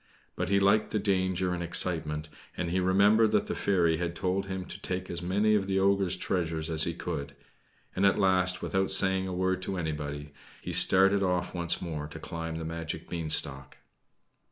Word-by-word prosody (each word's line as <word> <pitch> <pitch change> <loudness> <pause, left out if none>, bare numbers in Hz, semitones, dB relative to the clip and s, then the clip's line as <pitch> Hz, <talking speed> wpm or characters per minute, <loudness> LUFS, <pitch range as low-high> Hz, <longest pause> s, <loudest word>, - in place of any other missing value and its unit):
But 90 0 -3
he 100 0 +3
liked 100 +2 +3
the - - -1
danger 95 -3 0
and 90 - -4
excitement, 80 -3 +1 0.3
and 85 -2 -2
he 95 - +1
remembered 100 +4 +4
that - - +2
the - - -3
fairy 85 -5 +1
had 85 0 -3
told 95 +1 -2
him 95 -1 -5
to - - -9
take 95 0 -3
as 85 0 -4
many 100 +5 +1
of 100 -2 +1
the 95 -1 0
ogre's 95 -1 +2
treasures 80 -3 -2
as 80 -1 +3
he - - -3
could; 70 0 -5 0.6
and 95 - 0
at 100 - +4
last, 95 -2 +2
without 95 0 -1
saying 95 0 +4
a - - -4
word 95 0 -1
to 95 0 -4
anybody, 75 -3 -5 0.3
he 90 - -6
started 95 +3 +4
off 90 -2 -1
once 85 0 -2
more 75 -4 -5
to 75 - -10
climb 80 0 -6
the 80 0 -5
magic 80 0 -5
beanstalk. 75 -5 -2
90 Hz, 190 wpm, -28 LUFS, 80-95 Hz, 0.6 s, remembered